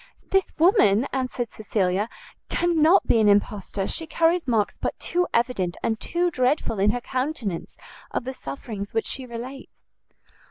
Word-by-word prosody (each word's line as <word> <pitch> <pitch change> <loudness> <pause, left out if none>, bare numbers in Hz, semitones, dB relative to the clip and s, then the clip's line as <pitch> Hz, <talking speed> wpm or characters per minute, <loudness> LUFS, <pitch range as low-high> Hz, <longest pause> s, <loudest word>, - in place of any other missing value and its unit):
"This 385 -1 +2
woman,"' 260 - +5
answered 255 -3 -2
Cecilia, 205 -1 -1 0.4
"cannot 345 +1 +4
be 230 - +3
an 215 -1 +5
impostor, 200 -1 +1
she 325 - -2
carries 330 +1 +2
marks 220 -4 +1
but - - -2
too 355 +1 0
evident 230 -8 0
and 220 -1 0
too 350 0 0
dreadful 255 -5 0
in 200 +2 +4
her 245 +3 0
countenance 255 - -3 0.3
of - - -2
the 260 +2 -4
sufferings 200 - -7
which 225 - +1
she 260 -1 -4
relates." 250 +3 -7
245 Hz, 150 wpm, -24 LUFS, 205-310 Hz, 0.4 s, woman